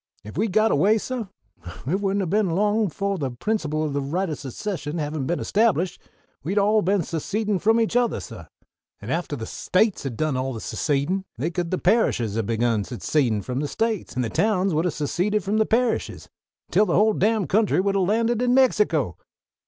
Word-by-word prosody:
"If 105 - -10
we'd 210 +4 0
got 215 +3 +3
away, 215 +3 +4
suh, 245 +1 -4 0.6
it 175 +9 0
wouldn't 195 0 0
ha' - - -4
been 210 -2 +2
long 205 +5 +2
befo' 200 +3 -2
the 140 -6 -2
principle 155 - -2
o' 155 - -1
the 140 0 -2
right 170 +6 -2
o' - - -1
secession 150 - -5
havin' 150 -3 -3
been 175 - -1
established, 190 -5 +1 0.4
we'd 185 +8 -2
all 210 +2 +4
ha' - - -5
been 195 -1 +2
secedin' 200 +6 -2
from 225 +4 +3
each 225 +1 0
othah, 245 -1 +2
suh; - - -9 0.5
and - - -6
after 165 -3 -2
the 115 -5 -6
States 195 - 0
had 130 -5 -5
done 155 -3 0
all 130 +1 -2
the 115 - -6
secedin' 155 - -1
they 150 +8 -2
could 175 -1 -2
the 185 - 0
parishes 125 - +2
would 115 -2 -1
ha' - - -8
begun 115 -2 +1
secedin' 120 -1 0
from 125 +6 -3
the 145 - -1
States; 225 +4 -2
an' 125 - 0
the 115 - -2
towns 195 - +1
would 160 +3 +1
ha' - - +2
seceded 180 +8 -1
from 205 +4 0
the 220 - +2
parishes 235 0 0 0.4
until 210 - +3
the 170 - +1
whole 215 +3 +4
damn 215 0 +1
country 205 +5 +2
would 195 +1 +1
ha' 195 - +1
landed 225 +5 +1
in 250 0 +3
Mexico!" 205 - +2
185 Hz, 210 wpm, -24 LUFS, 145-215 Hz, 0.6 s, away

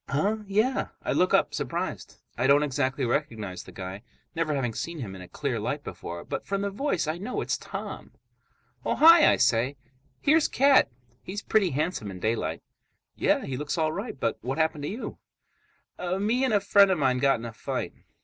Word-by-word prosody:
"Huh? 195 +10 +1
Yeah." 215 +7 +1 0.2
I - - -1
look 185 - +2
up, - - +3
surprised. - - -4 0.2
I 125 +2 +1
don't 145 +2 +5
exactly 135 -1 0
recognize 110 -8 -2
the - - -13
guy, 95 +1 -7 0.3
never 160 -3 0
having 125 -4 -1
seen 170 +8 -4
him 110 -10 -6
in 95 - -9
a 90 - -10
clear - - -3
light - - -3
before. 85 0 -7
But - - -5
from 195 0 -1
the 200 - -1
voice 205 - -1
I 155 +3 -3
know 215 +7 -3
it's - - -1
Tom. - - -7 0.7
"Oh, - - 0
hi!" 330 0 +8
I - - +4
say. 125 +5 +2 0.4
"Here's 310 +2 +4
Cat. 275 +1 +4 0.3
He's 205 +3 -6
pretty 210 -4 +2
handsome 150 - -2
in 95 -1 -8
daylight." 90 -7 -1 0.5
"Yeah, - - +1
he 130 - -4
looks 150 +3 -3
all 155 -1 +1
right, 200 - -5
but 115 -2 -1
what 130 +5 -3
happened 160 -2 0
to - - -2
you?" 225 +6 -6 1.0
"Me 230 +6 +1
and 250 - 0
a - - +5
friend 200 0 +5
of 190 - +2
mine 130 -3 +2
got 135 +1 +3
in 115 - -8
a 115 - -6
fight." - - -4
150 Hz, 195 wpm, -27 LUFS, 120-200 Hz, 1.0 s, hi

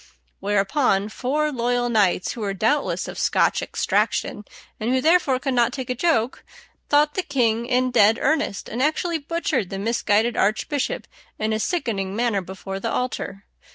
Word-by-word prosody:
Whereupon 200 +1 +1
four 295 +7 -1
loyal 245 -1 0
knights, 205 -6 +2
who 235 - -7
were 200 -2 -2
doubtless 230 +9 0
of - - -7
Scotch - - +2
extraction, 210 - -1 0.3
and 220 - -2
who 260 +1 +2
therefore 310 -2 +3
could 270 0 -2
not 240 -1 +3
take 260 -2 -4
a - - +2
joke, 250 -4 0 0.5
thought 295 +1 +4
the 375 - 0
king 235 -7 0
in 255 0 +1
dead 225 -1 +5
earnest, 285 -9 0
and 235 - -4
actually 320 +3 0
butchered 300 - -2
the 195 - -5
misguided 225 +1 +1
archbishop 285 - 0 0.3
in 215 0 -1
a 215 - -1
sickening 205 - -2
manner 230 -3 +1
before 190 +1 -7
the - - -2
altar. 205 -5 -3
240 Hz, 160 wpm, -23 LUFS, 205-280 Hz, 0.5 s, dead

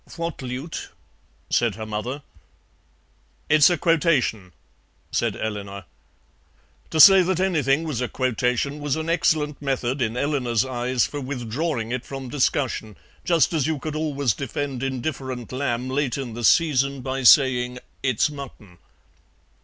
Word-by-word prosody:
"What 165 -3 -4
lute?" 130 +5 -6 0.6
said 115 -5 +2
her 110 0 -6
mother. 115 +7 -4 1.3
"It's 150 +1 +6
a 175 - +1
quotation," 145 - +1 0.6
said - - 0
Eleanor. 100 -3 -5 1.0
To 160 - -2
say 195 +4 +10
that 185 0 0
anything 155 -6 +1
was 150 -7 -3
a 125 - 0
quotation 130 +3 -1
was 145 -2 -1
an 160 +1 -2
excellent 155 -4 +1
method, 135 -1 -1
in 115 0 -1
Eleanor's 125 -4 0
eyes, 125 -1 0
for 145 - -5
withdrawing 125 -1 -3
it 125 -1 -2
from 135 -2 -7
discussion, 130 -5 -1 0.3
just 170 -2 +3
as 155 -3 +1
you 160 -1 -1
could 155 +2 -5
always 145 -6 0
defend 135 +2 -4
indifferent 130 -2 -4
lamb 130 -2 -2
late 135 0 -1
in 130 -4 -5
the 120 +1 -6
season 140 -2 +3
by 130 +1 -3
saying 125 -1 +5 0.2
"It's 130 0 +2
mutton." 125 - -10
135 Hz, 140 wpm, -23 LUFS, 120-150 Hz, 1.3 s, say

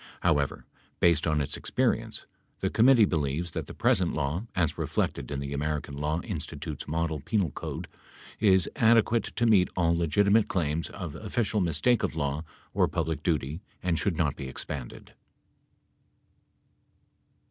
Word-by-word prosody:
However, 75 -5 +1 0.3
based 85 -2 +3
on 75 -2 +2
its 70 - -2
experience, - - -1 0.3
the - - -1
com 115 +3 +4
mittee 120 -6 +7
believes 80 +1 -1
that - - -4
the - - -9
present 115 -8 +2
law, 80 +9 -2
as 80 -4 +1
reflected - - -2
in 70 - -3
the 70 0 -4
American 75 0 -2
Law 75 +3 -1
Institute's - - -5
model 80 0 -1
penal 90 - 0
code, - - -6 0.5
is 95 -5 +4
adequate 115 0 +4
to 120 - -1
meet 100 -5 +5
all 85 -1 +3
legitimate 100 +6 +3
claims 80 -2 -1
of 90 -7 -6
official 105 +3 -1
mistake 90 +8 +2
of - - -1
law 70 0 -1 0.3
or - - +3
public 80 -3 -2
duty 75 0 -1 0.2
and 90 -2 +1
should 95 -6 0
not 75 -3 +1
be 70 - -6
expanded. 65 -1 -7
85 Hz, 145 wpm, -28 LUFS, 75-100 Hz, 0.5 s, mittee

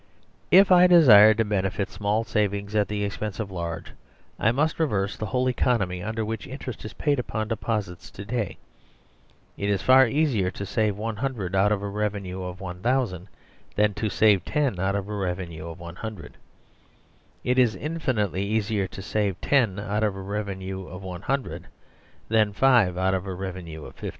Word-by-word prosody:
If 190 +1 +6
I 180 0 +8
desire 110 - +8
to 115 +1 +1
benefit 95 -1 -1
small 105 +2 0
savings 100 -2 -1
at 105 -1 +2
the 105 0 -2
expense 100 0 -4
of 105 -3 -4
large, 85 -2 -5 0.5
I 110 - +3
must 150 +7 0
reverse 105 -10 0
the 110 - -4
whole 125 +6 0
economy 105 -8 0
under 110 +2 -3
which 110 +1 -5
interest 130 -3 -7
is 110 - -7
paid 145 -3 0
upon 110 -3 -3
deposits 105 -6 -3
to 100 - -9
day. 110 -2 -3 1.0
It 100 - -2
is 100 -2 0
far 130 0 +7
easier 130 -9 +1
to 100 +1 -6
save 105 0 0
;ioo 110 -2 -3
out 95 +2 +3
of 100 -1 0
a - - -2
revenue 100 -2 -3
of 90 0 -6
1000 95 +1 -2 0.5
than 105 0 +2
to 110 +2 -2
save 100 -2 +3
10 135 -9 -1
out 95 +2 0
of 100 -1 -3
a 105 - -5
revenue 90 -4 -4
of 85 +1 -9
100. 85 0 -8 1.1
It 125 +1 +2
is 120 -5 +3
infinitely 120 - -1
easier 105 -1 0
to 95 - -9
save 100 -1 -1 0.2
;io 115 -9 +3
out 105 +1 -2
of 105 -2 0
a 95 - -6
revenue 95 -2 -5
of 90 +1 -9
^100 95 +9 -3 0.6
than 110 -2 +2
5 115 -7 +4
out 95 +1 +1
of 95 +1 -2
a 95 - -3
revenue 90 -4 -7
of - - -11
50. - - -6
105 Hz, 175 wpm, -25 LUFS, 95-115 Hz, 1.1 s, I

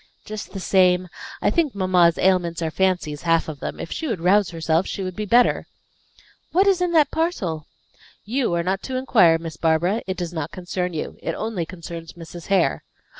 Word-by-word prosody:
"Just 215 -1 -7
the 195 - -5
same. 180 -1 +3 0.3
I - - +3
think 315 - 0
mamma's 180 -3 +3
ailments 175 -3 +1
are 160 - -1
fancies, 175 -5 0
half 165 -1 +2
of 155 -3 -6
them; - - -5
if - - -6
she 320 - -3
would 225 - -2
rouse 185 +2 +3
herself 165 +1 0
she 195 - -4
would 185 -1 -5
be 210 0 -4
better. 245 +4 +3 0.8
What 375 +4 +4
is 385 -3 +3
in 360 -1 +1
that 305 -4 +4
parcel?" 185 - -2 0.6
"You 245 +2 0
are 170 - 0
not 190 +2 -1
to 260 - -5
inquire, 205 -11 +4
Miss 165 -1 -8
Barbara. 170 +7 +1
It 190 - -3
does 175 -1 -4
not 160 -2 -3
concern 180 0 -3
you. 155 - -5
It - - -3
only 215 -7 -3
concerns 170 -2 -8
Mrs. 170 0 -10
Hare." 195 -1 +2
180 Hz, 195 wpm, -22 LUFS, 165-210 Hz, 0.8 s, What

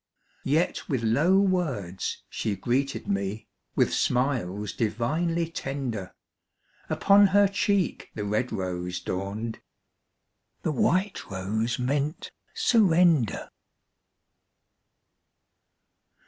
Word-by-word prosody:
Yet 155 +7 0
with 130 -6 0
low 150 +12 +3
words 145 - -1
she 105 - -2
greeted 130 +6 -1
me, 100 +2 -2 0.3
With - - +2
smiles 110 -6 0
divinely 160 +10 -1
tender; 130 - -4 0.7
Upon 200 0 +5
her 200 +1 +5
cheek 200 -1 0
the 105 - -3
red 105 +5 -1
rose 90 -1 -3
dawned, 100 +5 -4 1.0
The - - 0
white 185 +8 0
rose 105 +5 -2
meant 140 +5 -2 0.2
surrender. 180 - +3
125 Hz, 85 wpm, -27 LUFS, 105-170 Hz, 1.0 s, Upon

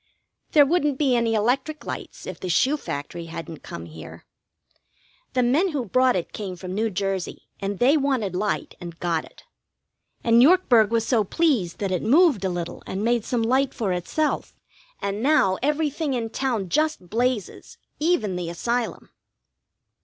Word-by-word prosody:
There 290 -2 +7
wouldn't 295 -3 +1
be 270 -4 +2
any 230 -1 +1
electric 265 +8 0
lights - - -7
if - - -7
the 185 - -5
shoe 260 - +3
factory 165 - -5
hadn't 165 -1 -8
come 85 - -8
here. 80 -1 -11 1.1
The 250 - +2
men 305 +9 +2
who 270 -5 -1
brought 255 +4 +3
it 180 - -3
came 195 -4 -5
from 180 +1 -7
New 220 +3 0
Jersey, 195 -2 -3 0.2
and 200 0 -3
they 265 +8 +4
wanted 260 - 0
light, 210 +3 -2
and 170 -1 -8
got 170 -2 -1
it. - - -18 0.8
And 230 0 +5
Yorkburg 255 - +5
was 230 -1 +1
so 230 -4 +2
pleased 230 - +1
that 195 -2 -2
it 180 - 0
moved 280 - +4
a 190 - +1
little 175 -2 -4
and 195 +2 -3
made 235 -1 +2
some 240 -2 0
light 260 +3 +1
for 200 -5 -1
itself; 240 - -2 0.5
and 200 +1 -2
now 260 -9 +3
everything 295 0 0
in 225 -2 -3
town 235 -9 -1
just 305 - 0
blazes, 240 -2 -2 0.2
even 295 - +1
the 175 -2 -3
Asylum. 235 +7 -3
230 Hz, 165 wpm, -24 LUFS, 185-275 Hz, 1.1 s, There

